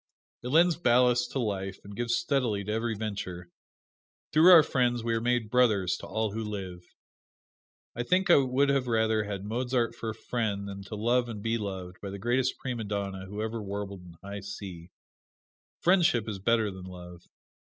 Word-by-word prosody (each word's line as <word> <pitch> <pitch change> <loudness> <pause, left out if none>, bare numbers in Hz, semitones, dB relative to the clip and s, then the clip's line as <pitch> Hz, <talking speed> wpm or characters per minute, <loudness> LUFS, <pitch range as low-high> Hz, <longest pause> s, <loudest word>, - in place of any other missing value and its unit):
It 125 - -6
lends 165 +5 +4
ballast 125 -4 +3
to - - -2
life, 95 -4 -2
and 100 0 -10
gives 120 +1 0
steadily 120 -8 0
to 105 - -4
every 110 +1 -1
venture. 95 -5 -5 0.8
Through 160 +4 +7
our 165 -3 +10
friends 120 -4 0
we 115 0 0
are 115 - 0
made 120 -2 0
brothers 110 -8 +3
to - - -9
all 110 +1 -1
who 110 +2 -3
live. 95 -4 -6 1.1
I 120 - -2
think 185 +9 +2
I - - +8
would 135 +1 +2 0.2
rather 110 -2 +2
have 105 - -6
had 100 0 -5
Mozart 120 +1 0
for 115 -1 -5
a 110 - -5
friend 110 -4 -2
than 100 0 -7
to 105 - -6
love 120 +3 +1
and 105 -3 -6
be 115 0 0
loved 95 -3 -6
by 100 - -5
the 100 - -6
greatest 120 +5 0
prima 120 -4 -4
donna 100 -2 -4
who 105 +2 -4
ever 110 0 -3
warbled 100 -1 -5
in 90 -1 -13
high 100 +1 -6
C. 95 -3 -8 0.9
Friendship 170 - +3
is 105 -3 -4
better 110 +1 +2
than 95 -1 -9
love. 90 -1 -11
110 Hz, 185 wpm, -28 LUFS, 100-120 Hz, 1.1 s, our